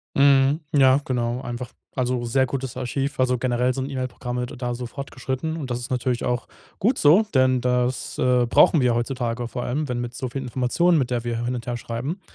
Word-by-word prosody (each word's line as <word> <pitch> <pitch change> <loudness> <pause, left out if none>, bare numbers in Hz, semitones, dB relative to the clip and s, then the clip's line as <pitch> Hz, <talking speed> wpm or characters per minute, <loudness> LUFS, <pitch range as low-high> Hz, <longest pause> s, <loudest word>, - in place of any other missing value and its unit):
Mhm, 140 +2 +4
ja, 135 -2 +5
genau, 120 -1 -1
einfach 120 0 -5 0.3
also, 125 -1 0
sehr 130 +3 +2
gutes 130 -1 -4
Archiv. 135 +2 -3
Also, 125 -1 +2
generell 125 0 +1
sind 130 +1 -3
E-Mail-Programme 125 -2 -3
d - - -9
da 120 -1 -3
so 125 +1 -5
fortgeschritten. 140 +4 -4
Und 140 -5 -5
das 120 0 -2
ist 125 +1 -7
natürlich 125 -1 -1
auch 125 0 -1 0.3
gut 240 +6 +1
so, 170 +9 +5
denn 130 -1 +4
das, 125 0 -1
äh, 125 -1 +3
brauchen 150 +6 +5
wir 125 -3 +3
heutzutage 120 -1 -2
vor 125 0 -4
allem, 145 +3 -2
wenn 125 -1 -2
mit 120 0 -4
so 125 +1 -4
vielen 135 +2 -5
Informationen, 130 +8 +2
mit 130 -4 0
der 120 -2 -1
wir 120 0 -2
hin 125 +1 -1
und 120 -1 -7
her 120 - -1
schreiben. 125 - -4
125 Hz, 210 wpm, -23 LUFS, 120-135 Hz, 0.3 s, ja